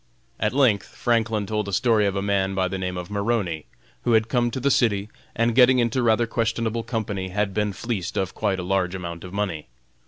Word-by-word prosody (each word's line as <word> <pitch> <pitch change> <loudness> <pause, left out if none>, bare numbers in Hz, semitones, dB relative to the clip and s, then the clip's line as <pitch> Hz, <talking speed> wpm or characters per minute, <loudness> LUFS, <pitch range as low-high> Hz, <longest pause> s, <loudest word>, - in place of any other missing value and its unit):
At 105 - +1
length 125 -7 +3
Franklin 115 -3 0
told 105 0 -2
a - - -4
story 105 +1 +3
of 100 - -1
a 100 - -1
man 95 -1 0
by 95 -1 +1
the 95 +1 -4
name 90 -1 -3
of 90 +2 -6
Maroney, 100 -6 -1 0.3
who 120 - +1
had 110 0 +3
come 120 -2 +2
to 125 - -4
the 140 +2 +2
city, 105 -5 +2 0.3
and 115 +1 +2
getting 130 +1 +6
into 120 +1 +1
rather 115 0 +3
questionable 115 0 -1
company, 105 -5 -3
had 100 +1 -1
been 105 0 0
fleeced 100 -2 -4
of 95 -1 -1
quite 100 -3 0
a 90 - -4
large 95 0 0
amount 85 -2 -6
of 90 - -8
money. 95 -6 -3
105 Hz, 215 wpm, -24 LUFS, 95-115 Hz, 0.3 s, getting